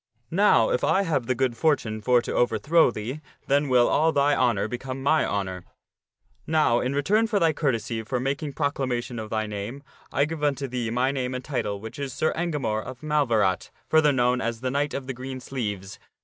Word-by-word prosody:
Now, 165 - +4
if - - 0
I 195 - +3
have 145 -10 -1
the 130 - +1
good 130 -1 0
fortune 115 -8 0
for 120 +2 +3
to - - -4
overthrow 120 +8 +3
thee, 120 +6 -5 0.2
then 140 +1 +2
will 125 -2 +5
all 160 +2 +3
thy 145 0 +3
honor 115 -6 +1
become 130 +3 -5
my 155 +2 +3
honor. 95 -3 -3 0.8
Now, 150 -7 +3
in 130 +2 -1
return 210 +11 +2
for 210 -2 +1
thy 165 -3 +3
courtesy 120 -6 -1
for 125 +3 -2
making 140 +3 -2
proclamation 130 -5 -2
of 110 -1 -6
thy 110 0 -1
name, 105 +6 -6 0.3
I 140 - +2
give 155 0 -6
unto 140 -2 0
thee 120 -2 -3
my 125 +3 +1
name 130 -2 -2
and 125 - -6
title, 105 -8 -2
which 110 +6 -9
is 140 -3 -4
Sir 155 - 0
Engamore 145 -11 -1
of 130 +3 -9
Malverat, 115 -11 +1 0.2
further 155 -2 +5
known 125 -1 +2
as 115 0 -3
the 130 0 -1
Knight 145 +2 -1
of 135 - -4
the 135 - -4
Green 130 +1 -6
Sleeves. 105 -7 -5
130 Hz, 200 wpm, -25 LUFS, 115-145 Hz, 0.8 s, will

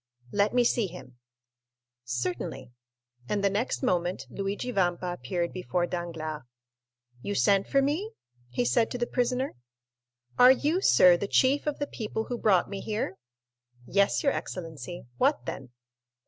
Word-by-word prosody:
"Let 205 +1 +2
me 245 - +5
see 235 -3 +2
him." 145 -8 -12 0.9
"Certainly." 130 +1 -3 0.6
And 205 -1 0
the 200 - +3
next 225 +7 -1
moment 180 -6 0
Luigi 200 +5 -3
Vampa 180 -3 0
appeared 170 +5 -3
before 180 -1 -1
Danglars. 165 -3 -4 0.8
"You 205 +7 -3
sent 200 -1 +3
for 275 0 +3
me?" 345 +11 -1 0.4
he 125 0 -1
said 125 - +2
to - - -4
the 240 - 0
prisoner. 250 +2 -1 0.9
"Are 250 +1 +9
you, 300 +7 +1
sir, 180 - +6
the 200 - -3
chief 270 +7 +3
of 300 - -1
the 290 - -1
people 220 -4 -4
who 240 +1 -5
brought 195 -5 +3
me 200 - -5
here?" 210 -3 -3 0.7
"Yes, 200 +8 +2
your 280 - +3
excellency. 165 -3 -6
What 125 - +2
then?" 130 +1 -6
195 Hz, 145 wpm, -28 LUFS, 175-245 Hz, 0.9 s, Are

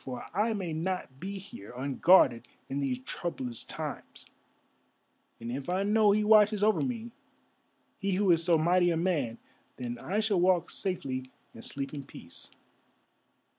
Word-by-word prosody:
For 125 -2 -6
I 215 +5 +1
may 185 -6 -3
not 165 -5 -3
be 195 +4 -5
here 185 - -10
unguarded 130 -2 +4 0.2
in 135 - -2
these 130 -2 -2
troublous 130 -9 -4
times, - - -7 1.1
and 115 +1 -5
if 135 +5 -5
I 185 +2 +1
know 210 +1 +4
he 210 +1 +3
watches 210 -1 +5
over 215 0 +3
me, 235 -2 -3 0.9
he 200 -2 -1
who 190 0 +3
is 165 -1 +3
so 170 -1 +4
mighty 175 +3 +3
a 165 - +1
man, 155 -10 0 0.4
then 120 -1 -5
I 200 +4 -1
shall 215 -4 +1
walk 180 -1 +3
safely 135 -10 -3 0.2
and 115 - -11
sleep 140 +1 -3
in 140 -2 -5
peace." 85 -9 -10
175 Hz, 155 wpm, -30 LUFS, 130-200 Hz, 1.1 s, watches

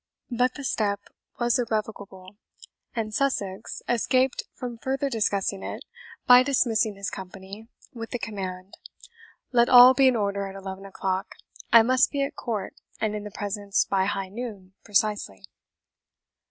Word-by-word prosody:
But 250 +1 +1
the 285 - -7
step 205 -6 0 0.4
was 240 +1 +2
irrevocable, 210 -4 -4 0.6
and 215 -2 -3
Sussex 210 -7 -2
escaped 255 +2 +1
from 240 -2 -6
further 270 +2 -2
discussing 200 -3 0
it - - -6 0.4
by 250 0 +8
dismissing 235 -5 +1
his 195 -3 -4
company, 195 +3 -9 0.3
with 230 -2 -7
the 245 - -3
command, 190 -4 -6 0.7
"Let 240 -1 +4
all 250 +1 +10
be 270 0 +4
in 255 - +4
order 200 -2 -1
at 195 - -9
eleven 195 0 -7
o'clock; 190 0 -3 0.4
I 230 -1 +8
must 255 +4 +3
be 280 -1 -1
at 275 - -4
court 215 -6 -4 0.3
and 215 -1 -1
in 210 0 -5
the - - -5
presence 205 0 -1
by 190 -1 +1
high 195 -1 -2
noon 205 -4 -8
precisely." 205 - 0
215 Hz, 145 wpm, -26 LUFS, 195-245 Hz, 0.7 s, all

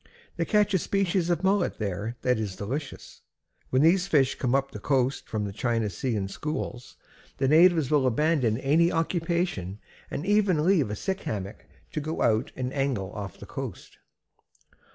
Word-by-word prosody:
They 170 - -1
catch 210 +1 +2
a 190 - +3
species 185 -2 0
of 175 +1 0
mullet 195 -1 +1
there 105 +3 -3
that 125 -2 +2
is 100 -4 -3
delicious. 130 +9 -6 0.5
When 130 +2 +3
these 180 +3 +4
fish 140 -7 +3
come 125 0 0
up 135 0 0
the 105 - -7
coast 135 +3 0
from 105 -2 -2
the 100 - -5
China 115 -1 -1
Sea 120 +6 -2
in 100 -2 -1
schools, 125 +1 -5 0.4
the 135 - +1
natives 160 -1 +5
will 145 -3 +3
abandon 130 -3 +2
any 155 +6 +3
occupation 165 - -1 0.3
and 150 - -4
even 195 -6 +3
leave 170 - +3
a 105 - -3
sick 190 - -3
hammock 100 -8 -5 0.3
to 155 - -3
go 155 +2 -2
out 115 +5 +2
and 130 0 -3
angle 135 -9 -1
off 100 -4 -6
the - - -9
coast." - - -7
135 Hz, 175 wpm, -27 LUFS, 110-170 Hz, 0.5 s, natives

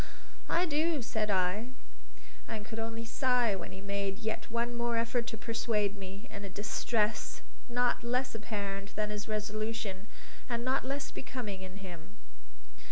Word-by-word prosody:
"I 350 - +5
do," 310 -2 +3
said 215 -1 0
I, 190 +4 +3 0.8
and 215 -2 -3
could 225 0 -4
only 225 +1 -2
sigh 245 -3 +4
when 185 - -5
he 190 - -7
made 200 -1 0
yet 220 0 -2
one 235 +1 +1
more 235 -1 +2
effort 235 +1 +2
to 225 - -3
persuade 215 -2 +1
me, 195 +3 -7
in 200 - -5
a 200 - -4
distress 215 +2 +1 0.3
not 245 0 +3
less 250 +2 +1
apparent 200 -3 -3
than 210 0 +1
his 210 -1 -3
resolution, 215 -2 -1 0.4
and 235 0 0
not 260 +1 +3
less 275 +1 -1
becoming 215 -8 -4
in 190 +1 -7
him. 170 -3 -8
220 Hz, 155 wpm, -33 LUFS, 200-240 Hz, 0.8 s, I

